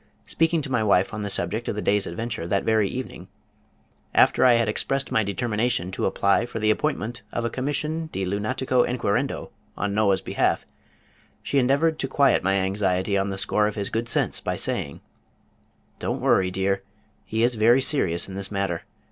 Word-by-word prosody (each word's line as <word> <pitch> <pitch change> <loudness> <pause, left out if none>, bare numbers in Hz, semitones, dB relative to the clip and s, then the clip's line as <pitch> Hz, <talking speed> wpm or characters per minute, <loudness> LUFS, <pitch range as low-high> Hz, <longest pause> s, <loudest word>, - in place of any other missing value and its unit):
Speaking 165 -1 +1
to 135 - -6
my 120 -3 +2
wife 100 -2 +2
on 110 - -4
the 100 - -3
subject - - -2
of - - -2
the - - -3
day's 105 0 +2
adventure 110 0 -4
that 100 +2 0
very 110 -3 +2
evening, 130 0 -6 0.9
after - - +5
I 125 -1 +7
had 115 -1 +2
expressed 135 +5 -1
my 110 - +2
determination 105 -2 -1
to - - -1
apply 100 +4 +2
for 120 - -6
the 110 -1 +2
appointment 110 +2 -2
of 120 - -2
a 115 - -1
Commission 150 +5 -2
De 95 - -2
Lunatico 125 +6 0
Enquirendo 120 -5 -1 0.3
on 100 -1 -1
Noah's 100 -2 +2
behalf, - - 0 0.8
she 140 - +1
endeavored 140 +5 +2
to 135 - -1
quiet 140 0 +3
my 95 +1 +2
anxiety 95 0 0
on 100 0 +1
the 95 - -4
score 105 +2 +2
of 105 - -4
his 100 -2 -2
good 115 +1 -2
sense - - +1
by - - -3
saying: 70 - -3 1.0
"Don't - - -2
worry, 95 - +3
dear. 95 +1 -1 0.4
He 110 +1 -1
is 120 +1 +3
very 115 +3 +4
serious 90 - +1
in 95 - -9
this 95 0 -4
matter. 95 -4 -2
110 Hz, 185 wpm, -24 LUFS, 100-125 Hz, 1.0 s, I